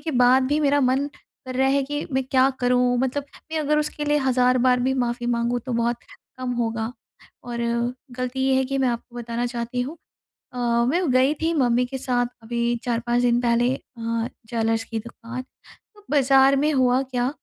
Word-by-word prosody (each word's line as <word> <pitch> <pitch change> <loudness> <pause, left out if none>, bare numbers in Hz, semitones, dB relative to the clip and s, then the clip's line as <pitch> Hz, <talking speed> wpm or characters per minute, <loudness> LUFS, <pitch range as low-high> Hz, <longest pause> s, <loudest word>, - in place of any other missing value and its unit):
के 320 - -3
बाद 260 +1 +5
भी 295 +1 +2
मेरा 285 0 +3
मन 265 +2 +2 0.4
कर 255 - -5
रहा 265 0 +3
है 275 +1 +2
कि 290 +2 -4
मैं 265 0 +1
क्या 260 0 +3
करूँ? 245 0 +3
मतलब 265 +2 -1 0.3
मैं 320 - 0
अगर 300 0 +1
उसके 300 0 -2
लिए 295 0 +2
हज़ार 255 -2 +3
बार 250 -1 +4
भी 265 +2 +1
माफ़ी 240 -1 -1
माँगू 240 0 0
तो 250 +1 -6
बहुत 235 0 +1 0.4
कम 255 -1 -2
होगा। 225 +1 -2 0.5
और 240 -1 -5 0.6
गलती 255 +1 -3
ये 265 - +3
है 265 - +2
कि 275 +1 -2
मैं 260 -2 +2
आपको 240 0 -5
बताना 235 0 -3
चाहती 240 0 -3
हूँ 285 +7 -6 0.6
अ, - - -8 0.3
मैं 340 +1 +1
गई 260 +3 +4
थी 330 +1 +1
मम्मी 250 -4 +2
के 265 +2 -5
साथ 250 -2 0 0.2
अभी 235 +1 -1
4-5 240 0 0
दिन 240 0 +3
पहले 240 +1 +2
अ, 230 -2 -4 0.2
ज्वेलर्स 225 -1 0
कि 225 -1 -4
दुकान। 235 +2 -8 0.5
तो 415 - -20
बाज़ार 270 -1 +5
में 300 +3 +2
हुआ 255 0 +3
क्या 250 -2 -1
250 Hz, 195 wpm, -23 LUFS, 240-270 Hz, 0.6 s, बाद